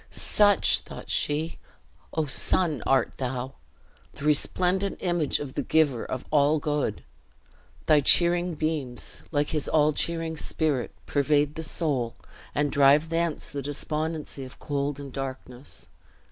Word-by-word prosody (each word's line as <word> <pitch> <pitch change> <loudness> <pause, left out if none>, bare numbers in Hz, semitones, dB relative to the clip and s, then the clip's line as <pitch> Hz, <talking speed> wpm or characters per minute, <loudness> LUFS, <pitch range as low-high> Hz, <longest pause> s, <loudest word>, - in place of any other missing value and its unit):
"Such," 205 -3 +3
thought - - -9
she, 155 +3 -1 0.5
"O 160 -1 0
sun, 150 0 +2
art 135 -2 +2
thou! 130 0 -3 0.6
The 140 - -8
resplendent 180 +6 +1
image 175 -5 0
of 140 -3 -6
the - - -1
Giver 145 -7 +2
of 130 - -5
all 150 +1 +4
Good. 145 -7 -2 0.8
Thy 155 -1 +5
cheering 175 +4 +4
beams, 150 -6 -3
like 145 -1 0
his 150 -2 -2
all 155 -1 +3
cheering 165 0 -1
Spirit, 150 -6 -1
pervade 145 +1 +1
the 160 - -5
soul, 145 -7 -1 0.4
and 145 -1 +1
drive 145 +3 +4
thence 165 -1 -1
the 140 - -4
despondency 150 +1 -4
of 130 - -11
cold 145 0 -3
and 140 -2 -8
darkness. 130 -1 -7
150 Hz, 130 wpm, -26 LUFS, 140-160 Hz, 0.8 s, Thy